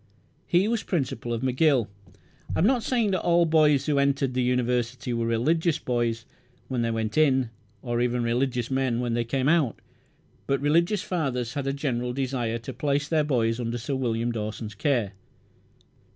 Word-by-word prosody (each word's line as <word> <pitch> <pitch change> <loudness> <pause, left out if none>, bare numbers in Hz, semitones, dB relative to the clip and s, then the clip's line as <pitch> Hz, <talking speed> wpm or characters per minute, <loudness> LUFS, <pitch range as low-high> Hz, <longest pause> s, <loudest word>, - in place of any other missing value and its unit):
He 180 +4 +3
was 230 -1 0
principal 130 - -2
of 115 +1 -2
McGill. 130 -2 +2 0.7
I - - -1
am 165 - +3
not 245 +1 +3
saying 230 -3 +1
that 185 - 0
all 170 0 +3
boys 155 -3 +3
who 145 -2 +1
entered 140 -1 +1
that 130 - 0
University 125 0 0
were 115 -1 -1
religious 155 +8 +1
boys 120 -2 -1 0.4
when 125 -3 -1
they 115 - 0
went 110 +4 -1
in, 130 -6 +3 0.3
or 120 0 -1
even 120 0 0
religious 120 +1 -1
men 130 -3 0
when 120 -1 -1
they 120 0 +1
came 130 +3 -1
out; 150 -7 +2 0.7
but 135 0 +1
religious 170 - +2
fathers 125 -9 -2
had 140 -1 -3
a - - +1
general 125 -4 -2
desire 125 -3 -2
to 115 - -7
place 145 0 0
their 155 -1 +2
boys 120 -5 0
under 120 0 -2
Sir 130 +4 -4
William 120 -2 -1
Dawson's 110 -1 -5
care. 120 -3 0
130 Hz, 175 wpm, -26 LUFS, 120-150 Hz, 0.7 s, He